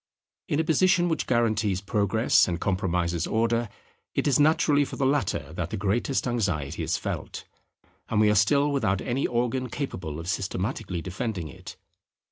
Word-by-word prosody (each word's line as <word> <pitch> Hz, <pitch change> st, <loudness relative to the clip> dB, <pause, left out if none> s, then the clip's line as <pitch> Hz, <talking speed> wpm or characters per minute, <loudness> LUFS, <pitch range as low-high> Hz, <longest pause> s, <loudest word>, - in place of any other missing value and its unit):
In 145 Hz, -, 0 dB
a -, -, +3 dB
position 175 Hz, +2 st, +3 dB
which 160 Hz, -, -1 dB
guarantees 110 Hz, -5 st, +1 dB
Progress 105 Hz, +3 st, +2 dB
and 85 Hz, -2 st, -2 dB
compromises 90 Hz, -3 st, 0 dB
Order, 115 Hz, 0 st, +1 dB, 0.5 s
it -, -, 0 dB
is 140 Hz, -2 st, +3 dB
naturally 145 Hz, -1 st, +4 dB
for -, -, -6 dB
the 140 Hz, -, 0 dB
latter 135 Hz, -6 st, 0 dB
that -, -, -3 dB
the 110 Hz, -, -4 dB
greatest 110 Hz, +7 st, 0 dB
anxiety 95 Hz, -, -1 dB
is -, -, 0 dB
felt; -, -, -5 dB, 0.7 s
and 110 Hz, -, +1 dB
we 105 Hz, -1 st, +5 dB
are -, -, +3 dB
still 140 Hz, +8 st, +3 dB
without 100 Hz, -9 st, +1 dB
any 130 Hz, +3 st, -1 dB
organ 125 Hz, +1 st, -1 dB
capable 90 Hz, -, -5 dB
of 80 Hz, -, -7 dB
systematically 95 Hz, -1 st, -3 dB
defending 95 Hz, -3 st, -4 dB
it. -, -, -11 dB
110 Hz, 160 wpm, -26 LUFS, 95-135 Hz, 0.7 s, we